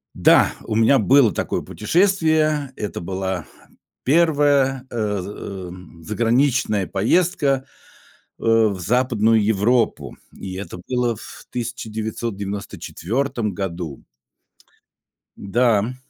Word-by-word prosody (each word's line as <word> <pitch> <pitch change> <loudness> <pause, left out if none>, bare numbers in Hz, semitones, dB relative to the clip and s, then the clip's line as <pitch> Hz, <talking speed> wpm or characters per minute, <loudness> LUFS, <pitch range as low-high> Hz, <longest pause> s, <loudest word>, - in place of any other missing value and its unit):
Да, - - +5
у 110 - -3
меня 115 +5 +5
было 130 -7 +5
такое - - -2
путешествие. 155 - +1
Это 105 -6 -5
была 95 -1 -3 0.6
первая, 145 -3 +3
э, 105 -4 -1
за 100 - -7 0.4
эм, 90 -2 -12
заграничная 115 - +1
поездка, 140 - +1 0.7
э, - - -10
в 110 -4 +3
Западную 115 +1 +2
Европу, 110 +3 +1 0.2
и 95 -1 -8
это 95 -2 -7
было 125 -2 0
в - - -12
1994 110 - -4
году. 85 -6 -5 1.3
Да, 115 +2 +2
м, 115 +5 -3
115 Hz, 95 wpm, -21 LUFS, 100-135 Hz, 1.3 s, Да